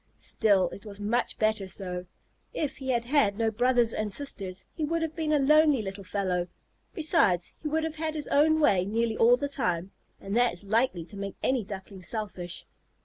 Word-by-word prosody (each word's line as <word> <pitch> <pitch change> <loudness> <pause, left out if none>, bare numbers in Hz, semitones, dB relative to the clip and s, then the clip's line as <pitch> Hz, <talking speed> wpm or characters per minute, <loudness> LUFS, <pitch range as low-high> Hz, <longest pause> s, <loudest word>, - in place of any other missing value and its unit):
Still, 200 -4 +2
it 200 - -10
was 205 -2 -9
much 215 +4 0
better 215 -2 +1
so. 180 -1 -4 0.5
If 300 - -2
he 265 -1 -6
had 235 -2 +1
had 245 -7 +2
no 225 -1 +1
brothers 240 0 +2
and 215 -1 -2
sisters, 195 -7 -3
he 320 - -4
would 330 +2 0
have 320 -1 -4
been 315 -2 -1
a 300 - +4
lonely 295 -2 +4
little 195 0 -6
fellow; 185 -2 -1 0.5
besides, 305 - +2
he 310 - -3
would 315 +1 0
have 320 -1 -4
had 315 0 -2
his 300 - -2
own 315 +2 +4
way 200 -12 +4
nearly 225 +3 -1
all 240 +2 +5
the 285 +2 -2
time, 190 - -2 0.3
and 195 +2 -5
that 245 -3 +3
is 175 - -5
likely 210 -4 +1
to 200 - -11
make 200 -1 -5
any 255 -3 +1
Duckling 195 -1 -8
selfish. 185 -4 -4
225 Hz, 200 wpm, -28 LUFS, 195-285 Hz, 0.5 s, all